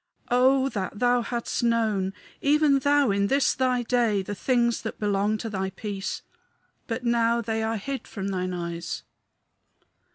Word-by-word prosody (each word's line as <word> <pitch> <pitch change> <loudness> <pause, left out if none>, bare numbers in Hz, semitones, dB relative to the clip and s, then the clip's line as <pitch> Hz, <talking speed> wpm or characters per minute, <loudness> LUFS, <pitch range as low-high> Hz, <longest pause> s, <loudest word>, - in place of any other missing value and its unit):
"Oh, 260 +2 +4
that 200 -4 -4
thou 245 +1 +3
hadst 235 +1 -3
known 220 -5 +1 0.3
even 290 -1 +4
thou 285 -3 +3
in 200 0 +1
this 275 +5 +3
thy 255 -1 +1
day 230 -5 +1
the 205 - -5
things 235 +1 +1
that 220 - -5
belong 205 +1 +1
to 225 - -5
thy 190 -3 -2
peace! 195 0 -5 0.6
But 235 +1 -3
now 235 -1 +2
they 225 -1 -2
are 220 0 -1
hid 270 +6 -5
from 200 -1 -4
thine 185 -1 -2
eyes." 170 -1 -4
225 Hz, 155 wpm, -26 LUFS, 200-250 Hz, 0.6 s, Oh